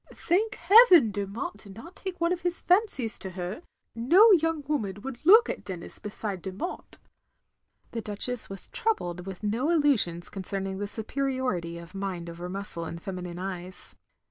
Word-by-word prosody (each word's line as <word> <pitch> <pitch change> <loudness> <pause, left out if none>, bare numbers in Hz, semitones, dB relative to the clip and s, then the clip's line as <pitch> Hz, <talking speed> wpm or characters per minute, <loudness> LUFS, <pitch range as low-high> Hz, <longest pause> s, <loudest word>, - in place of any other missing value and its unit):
Thank 430 +5 0
heaven 360 - +7
Dermot 205 - -4
did 195 -3 -12
not 335 - -11
take 380 -2 -6
one 340 +1 +2
of 360 - -5
his 355 -1 -1
fancies 355 - +2
to 190 - -6
her; 185 - -6 0.3
no 350 - +6
young 325 -4 +2
woman 220 -11 -1
wotdd 270 +1 -8
look 440 +6 +8
at - - -5
Denis 180 -3 -8
beside 205 -2 -5
Dermot," 195 - -6 0.9
the 230 - -4
Duchess 220 +3 0
was 195 -1 -6
troubled 180 - -2
with 190 +1 -8
no 230 +8 0
illusions 270 - +3
concerning 195 0 -4
the 205 - -3
superiority 230 -6 -2
of 170 +1 -11
mind 185 -3 -4
over 175 +1 -7
muscle 185 -3 -3
in 170 - -6
feminine 180 -1 -6
eyes. 185 0 -6
210 Hz, 160 wpm, -27 LUFS, -, 0.9 s, look